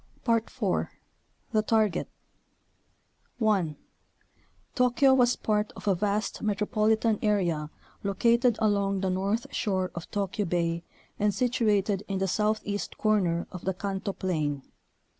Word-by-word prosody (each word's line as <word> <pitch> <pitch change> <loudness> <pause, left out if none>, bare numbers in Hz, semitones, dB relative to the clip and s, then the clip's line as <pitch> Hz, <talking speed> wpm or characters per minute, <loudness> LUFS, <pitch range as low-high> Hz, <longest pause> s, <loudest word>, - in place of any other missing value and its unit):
IV. 230 -1 +1 0.6
The 215 - +3
Target 215 -4 +1 1.3
1. 195 -10 +1 1.0
Tokyo 250 +1 +4
was 245 -2 +4
part 210 -1 0
of - - -10
a 200 - +5
vast 205 +3 -1
metropolitan 215 +1 +1
area 175 -8 +1 0.3
located 235 +4 +3
along 200 -3 +1
the 190 -1 0
north 200 +5 0
shore 185 -4 -1
of 170 -1 -7
Tokyo 205 0 -2
Bay 170 -1 0 0.4
and 205 -1 +2
situated 210 -5 +1
in 195 - -2
the 195 0 0
southeast 210 +1 -1
corner 185 -6 +1
of 180 -2 -8
the 190 -1 -1
Kanto 195 +1 -3
plain. 150 -8 -2
205 Hz, 120 wpm, -28 LUFS, 185-220 Hz, 1.3 s, a